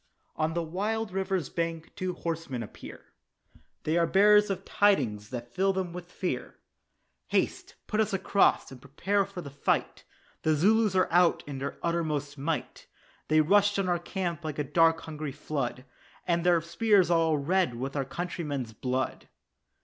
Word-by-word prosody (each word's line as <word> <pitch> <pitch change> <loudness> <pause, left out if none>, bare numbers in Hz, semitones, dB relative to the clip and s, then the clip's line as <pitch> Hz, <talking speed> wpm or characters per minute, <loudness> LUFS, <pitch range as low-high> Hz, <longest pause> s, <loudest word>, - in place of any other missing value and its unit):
On 160 +1 -1
the 170 - 0
wild 210 +6 -2
river's 190 -2 -1
bank 165 -1 -3
two 185 -1 -2
horsemen 165 -8 -4
appear, 105 - -12 0.7
They 160 +2 +1
are 170 - +3
bearers 210 +2 +5
of 195 - -3
tidings 120 - +2
that 120 -1 -7
fill 195 +1 +2
them 185 -2 -3
with 175 0 -8
fear; 180 - -3 0.7
"Haste, - - -1
put 215 - -2
us 220 - +2
across, 195 -3 +2
and 130 -2 -11
prepare 190 +9 0
for 195 -2 -8
the 140 -4 -9
fight, 140 - -1 0.4
The 155 -1 +2
Zulus 210 +5 +3
are 185 - +4
out 175 0 +4
in 140 -2 -6
their 140 +1 -4
uttermost 155 -4 -1
might; 150 +3 -4 0.4
They 155 0 +4
rushed 205 +5 +4
on 195 -2 0
our 175 -1 +1
camp 175 -1 -4
like 155 -2 -4
a 150 - 0
dark 165 +3 +3
hungry 155 -3 -6
flood, 135 -3 -4 0.4
And 170 -1 +1
their 175 -2 +4
spears 180 +2 +3
are 170 - +4
all 160 -2 +2
red 170 -1 +1
with 135 +4 -4
our 140 - 0
countrymen's 145 -5 -4
blood." 130 +3 -3
170 Hz, 165 wpm, -28 LUFS, 145-190 Hz, 0.7 s, bearers